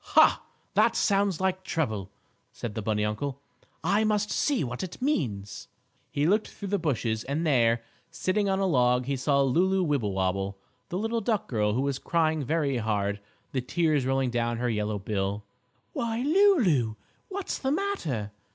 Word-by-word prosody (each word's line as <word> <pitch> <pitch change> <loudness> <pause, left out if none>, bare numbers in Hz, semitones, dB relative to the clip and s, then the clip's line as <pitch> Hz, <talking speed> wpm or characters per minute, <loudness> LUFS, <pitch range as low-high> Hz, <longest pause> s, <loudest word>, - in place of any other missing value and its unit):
"Ha! - - +7 0.3
That - - +4
sounds 200 -3 +2
like 190 0 0
trouble!" 110 - -2 0.4
said 115 - -6
the 110 - -3
bunny 105 0 0
uncle. 130 +6 -3 0.4
"I 200 +6 +3
must 210 -1 +1
see 285 -4 +1
what 125 -1 -4
it 185 -2 -6
means." 115 - -2 0.4
He 145 - 0
looked 210 +6 +2
through 200 - -7
the 200 0 +1
bushes 120 -8 -1
and 145 +5 -1
there, 120 -5 +3 0.3
sitting 200 +2 0
on 190 - +2
a 195 - +1
log, 125 -6 +3
he 140 +1 -1
saw 140 +1 +2
Lulu 185 +8 +2
Wibblewobble, 100 - 0 0.3
the 180 - -2
little 225 +3 -1
duck 215 -1 0
girl, 105 -3 +1
who 125 - +1
was 140 -1 -1
crying 160 -2 +1
very 140 -1 0
hard, 105 -2 -1 0.3
the 130 - -1
tears 150 +2 +1
rolling 135 -1 +1
down 120 0 0
her 120 0 0
yellow 105 -1 -1
bill. 100 0 -2 0.5
"Why, 230 +1 -1
Lulu! 270 - +4 0.3
What's 395 -1 -3
the 265 - -1
matter?" 165 - -2
140 Hz, 165 wpm, -27 LUFS, -, 0.5 s, Ha